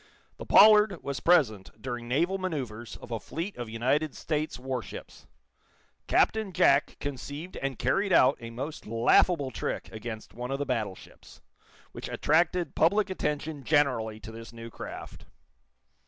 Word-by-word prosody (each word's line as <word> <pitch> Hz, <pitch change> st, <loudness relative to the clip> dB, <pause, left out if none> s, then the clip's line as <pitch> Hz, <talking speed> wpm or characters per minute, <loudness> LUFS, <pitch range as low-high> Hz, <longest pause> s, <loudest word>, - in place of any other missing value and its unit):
The -, -, -9 dB
"Pollard" 210 Hz, -3 st, +6 dB
was 140 Hz, -2 st, -3 dB
present 110 Hz, -, +2 dB
during 120 Hz, 0 st, -5 dB
naval 170 Hz, +10 st, +1 dB
manoeuvres 130 Hz, -11 st, -4 dB
of -, -, -12 dB
a 115 Hz, -, -2 dB
fleet 170 Hz, -, -5 dB
of 120 Hz, -2 st, -6 dB
United 130 Hz, +7 st, 0 dB
States 155 Hz, 0 st, -2 dB
warships. 130 Hz, -1 st, -7 dB, 0.8 s
Captain 220 Hz, -3 st, +2 dB
Jack 140 Hz, -3 st, +3 dB
conceived 145 Hz, +5 st, -6 dB
and 135 Hz, -2 st, -3 dB
carried 195 Hz, -, +1 dB
out 135 Hz, -5 st, +6 dB
a 115 Hz, -, -7 dB
most 135 Hz, +5 st, -6 dB
laughable 130 Hz, +6 st, +3 dB
trick -, -, -4 dB
against 110 Hz, 0 st, -7 dB
one 125 Hz, +2 st, -6 dB
of 135 Hz, -, -1 dB
the 145 Hz, -, -2 dB
battleships, 110 Hz, -8 st, -5 dB, 0.5 s
which -, -, -7 dB
attracted 170 Hz, +1 st, +1 dB
public 200 Hz, +4 st, +2 dB
attention 150 Hz, -4 st, -3 dB
generally 125 Hz, -7 st, +1 dB
to 110 Hz, -, -9 dB
this 115 Hz, +1 st, -10 dB
new 115 Hz, 0 st, -9 dB
craft. -, -, -9 dB
135 Hz, 140 wpm, -28 LUFS, 115-165 Hz, 0.8 s, Pollard